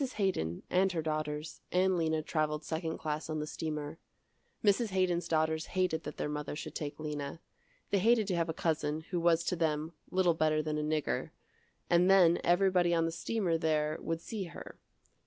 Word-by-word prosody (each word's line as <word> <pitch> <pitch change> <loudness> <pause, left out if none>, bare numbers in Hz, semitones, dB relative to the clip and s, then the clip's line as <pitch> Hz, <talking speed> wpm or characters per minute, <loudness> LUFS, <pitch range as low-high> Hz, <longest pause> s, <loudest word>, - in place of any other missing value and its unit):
Haydon, 85 - -1
and 185 +1 +2
her 165 - 0
daughters, 155 0 -3
and 185 +1 +3
Lena 160 -2 0
traveled 150 -1 -1
second 160 0 -3
class 155 0 -3
on 155 - -2
the 150 - -2
steamer. 150 0 -4 0.6
Mrs. 215 +2 +3
Haydon's 180 -3 +1
daughters 160 0 +1
hated 180 -4 +1
that - - -6
their - - -1
mother 150 0 -4
should - - -6
take 145 0 -5
Lena. 150 0 -4 0.5
They 200 - +3
hated 225 +2 +4
to 185 - +1
have 165 -1 0
a - - +2
cousin, 155 -2 -1
who 175 - 0
was 170 0 +3
to - - 0
them, 160 -1 -1 0.2
little 180 -2 +3
better 155 -1 +2
than 150 0 -1
a - - 0 0.2
nigger, - - -2 0.6
and 175 +1 +4
then 175 -3 +6
everybody 175 -1 +3
on 165 0 +2
the 165 - -1
steamer 175 -2 -1
there 155 -1 +1
would 165 0 -2
see 210 0 -4
her. 170 - -10
165 Hz, 185 wpm, -32 LUFS, 155-180 Hz, 0.6 s, then